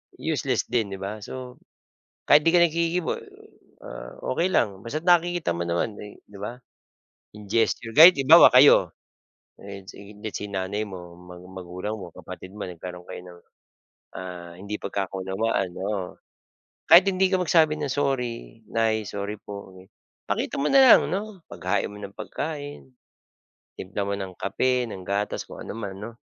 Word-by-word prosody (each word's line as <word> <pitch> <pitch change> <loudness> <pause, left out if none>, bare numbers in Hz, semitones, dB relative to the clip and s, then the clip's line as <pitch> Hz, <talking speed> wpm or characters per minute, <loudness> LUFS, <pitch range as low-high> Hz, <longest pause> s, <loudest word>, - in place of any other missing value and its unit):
Useless - - -1
din 110 -5 0
'di - - -11
ba. 105 +2 -5
So 125 +4 -9 0.7
kahit 145 - +6
'di 165 +2 +3
ka 175 - +6
naghihiwa, 170 +1 0 0.7
ah, - - -8 0.2
okey 170 +7 +1
lang 100 - 0
basta't 155 +8 -5
nakikita 175 - +3
mo 85 - -3
naman, 85 +5 -1
eh, 105 -1 -11
'di 100 -1 -14
ba 120 +4 -5 0.8
in 105 -1 -12
gesture. 115 +1 0
Kahit 170 +4 +11
halimbawa 160 +6 +8
kayo 130 +3 +7 0.6
ayan 100 -1 -11
si 100 0 -12
det 110 0 -6
si 105 0 -5
nanay 100 +2 -2
mo 90 -4 -9
mga 90 0 -13 0.2
magulang 90 +4 -5
mo, 90 -5 -9
kapatid 95 +3 -10
mo 105 -2 -6
nagkaroon 90 0 -9
kayo - - -8
ng, 90 -1 -13 0.8
ah, 90 -2 -8
hindi 100 +2 -4
pagkakaunawaan 95 0 -2
oo. 95 -2 -4 0.7
Kahit 180 +3 +9
hindi 190 0 +2
ka - - +3
magsabi 160 -3 +3
ng 145 -3 -2
"sorry 125 -5 -3
nay, 110 -1 0
sorry 100 +2 -5
po" 100 -1 -9 0.6
pakita - - -2
mo 140 - +1
na 270 - +6
lang 250 - +9
'no 200 0 -4
paghain 90 - -1
mo 105 - -11
ng 100 0 -7
pagkain, 145 +3 -6 0.9
timpla 100 +2 -5
mo - - -1
ng 95 -1 -5
kape, 125 +5 0
ng 95 - -8
gatas, 100 +1 -2
kung - - -11
ano - - -7
man 100 -4 -6
'no. 115 +3 -6
105 Hz, 160 wpm, -25 LUFS, 95-145 Hz, 0.9 s, Kahit